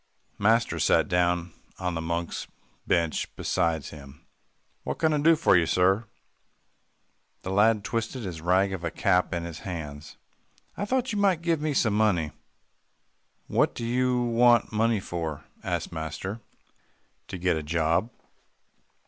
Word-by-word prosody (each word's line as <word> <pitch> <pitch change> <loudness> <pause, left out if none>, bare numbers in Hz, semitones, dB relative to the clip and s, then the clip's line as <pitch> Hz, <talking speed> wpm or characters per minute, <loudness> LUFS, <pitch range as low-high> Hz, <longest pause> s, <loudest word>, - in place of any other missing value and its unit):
Master 115 +3 +2
sat - - +3
down 90 -1 +1 0.2
on 90 -1 -2
the 80 - -3
monks' 85 +1 -3 0.4
bench 85 -3 0
beside 80 -4 0
him. 70 -1 -12 0.6
"What - - -3
can 160 -1 +2
I 150 - +1
do 165 +3 +5
for 155 - +4
you, 85 -2 +3
sir?" 95 +6 +2 1.4
The 95 - -4
lad 105 +2 +3
twisted 115 +2 -3
his 85 -5 -6
rag 95 +3 +2
of 90 -2 -5
a 85 - -1
cap 90 +2 +1
in 85 -2 -2
his 85 -1 -7
hands. 80 -6 -7 0.6
"I 205 - -3
thought 255 +3 0
you 205 - -1
might 190 -5 +2
give 165 -3 +1
me 150 -2 -1
some 110 -4 +2
money." 90 -8 +2 1.1
"What - - +1
do 115 - -4
you 125 +1 +1
want 120 0 +4
money 110 0 +2
for?" 80 -5 -5 0.2
asked - - -3
master. 85 +6 -5 0.9
"To - - -6
get 90 -1 +1
a 80 - -2
job." 85 +6 0
95 Hz, 150 wpm, -27 LUFS, 85-115 Hz, 1.4 s, do